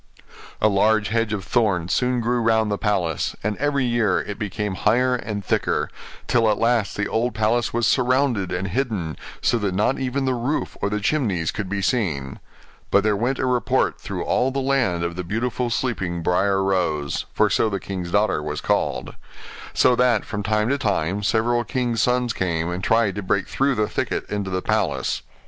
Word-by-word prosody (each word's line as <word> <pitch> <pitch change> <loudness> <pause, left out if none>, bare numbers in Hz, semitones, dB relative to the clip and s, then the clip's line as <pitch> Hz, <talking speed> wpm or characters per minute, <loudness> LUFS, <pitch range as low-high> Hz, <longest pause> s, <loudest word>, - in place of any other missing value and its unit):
A 110 - +4
large 105 0 +2
hedge 115 0 0
of 100 -3 -3
thorns 100 -8 +1
soon 125 -1 +1
grew 120 +1 0
round 110 -1 +2
the 100 - -1
palace, 90 -8 0
and 105 +1 -1
every 140 -2 +1
year 120 -5 +2
it 105 - -6
became 105 -1 -3
higher 125 +7 +2
and 105 -5 -4
thicker; - - 0 0.3
till 115 -2 +3
at 105 - +2
last 115 -4 +1
the 100 - 0
old 120 +2 -1
palace 110 +2 +1
was 120 0 0
surrounded 125 -6 +2
and 90 +2 -2
hidden, 100 - -2 0.3
so 120 - +2
that 100 -3 -1
not 105 +7 +1
even 135 +1 -1
the 130 - +1
roof 125 +5 -2
or 100 - +1
the 105 +1 -1
chimneys 100 - 0
could 100 -3 -4
be 100 0 -2
seen. 80 - -1 0.5
But 100 - +4
there 105 -1 +2
went 125 +6 0
a - - -1
report 125 -1 +1
through - - -4
all 125 +2 +1
the 135 - -4
land 130 -11 +1
of 85 0 -3
the 90 - -4
beautiful 120 +6 -2
sleeping 100 -8 -2
Briar 95 +3 +2
Rose 85 -7 -1
(for - - +3
so 110 - +2
the 100 -2 -2
king's 90 -3 -5
daughter 100 -4 +2
was 75 0 -4
called): - - -1 0.6
so 125 - +4
that, 120 -4 +2
from 105 -2 -4
time 105 +2 +1
to 140 +1 +1
time, 100 -3 0
several 120 +3 +1
kings' 120 -2 -1
sons 125 -1 +1
came, 85 -3 -1
and 90 +1 -4
tried 110 -3 +2
to 100 - -4
break 95 0 0
through 135 0 +1
the 105 -2 +1
thicket - - -2
into 100 -2 -2
the 95 0 -2
palace. - - 0
105 Hz, 195 wpm, -23 LUFS, 95-120 Hz, 0.6 s, A